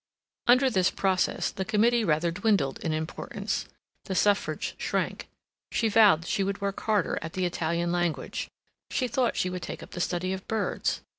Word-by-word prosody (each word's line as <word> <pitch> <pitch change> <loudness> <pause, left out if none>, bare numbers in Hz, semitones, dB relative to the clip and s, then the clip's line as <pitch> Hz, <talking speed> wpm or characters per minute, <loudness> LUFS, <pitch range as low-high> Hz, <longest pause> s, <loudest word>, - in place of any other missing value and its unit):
Under 255 +2 +6
this 185 -4 +3
process, 190 -2 0
the 190 - -3
committee 230 +4 +3
rather 165 -2 +2
dwindled 195 -7 +1
in 165 - -2
importance; 155 0 -3 0.4
the 190 - -3
Suffrage 205 +1 +1
shrank; - - -2 0.4
she 225 - +1
vowed 205 -7 +5
she 195 +1 0
would 200 +1 -2
work 200 -1 -2
harder 210 -5 +1
at 160 +1 -6
the 185 -1 0
Italian 170 0 -1
language; 175 -2 -2 0.4
she 255 - 0
thought 245 0 +1
she 180 - 0
would 180 0 -4
take - - -6
up - - -13
the 175 - -4
study 180 +1 -1
of 190 0 -7
birds. 220 -2 -1
190 Hz, 170 wpm, -28 LUFS, 175-215 Hz, 0.4 s, Under